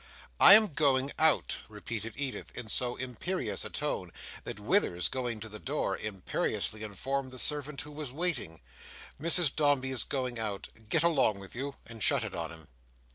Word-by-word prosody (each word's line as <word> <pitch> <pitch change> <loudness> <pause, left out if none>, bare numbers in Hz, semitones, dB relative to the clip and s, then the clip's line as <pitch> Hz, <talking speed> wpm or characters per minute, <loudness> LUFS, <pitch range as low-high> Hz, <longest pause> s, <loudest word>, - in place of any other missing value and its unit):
"I 200 - +12
am 215 -6 +6
going 135 -2 +1
out," 160 -1 +2
repeated 110 +1 -6
Edith, 135 -1 -5
in 120 -3 -5
so 125 +2 -1
imperious 130 - -3
a - - -3
tone - - -4 0.3
that - - -6
Withers, 105 - +2
going 120 -4 -4
to 110 - -6
the 105 0 -8
door, 135 -7 -2
imperiously 105 +1 -3
informed 130 +6 -3
the 130 - -8
servant 145 +1 -3
who 150 - -10
was 150 -3 -7
waiting, 140 - -2 0.6
"Mrs 170 -2 +5
Dombey 145 -3 +1
is 130 - +3
going 125 -3 -3
out. 105 -3 -3 0.2
Get 165 +5 +2
along 140 -11 +2
with 100 -1 -11
you," 135 +2 -5
and 115 -1 -11
shut 140 -1 +3
it 110 - -6
on 85 -1 -5
him. 80 -3 -13
130 Hz, 175 wpm, -29 LUFS, 110-145 Hz, 0.6 s, I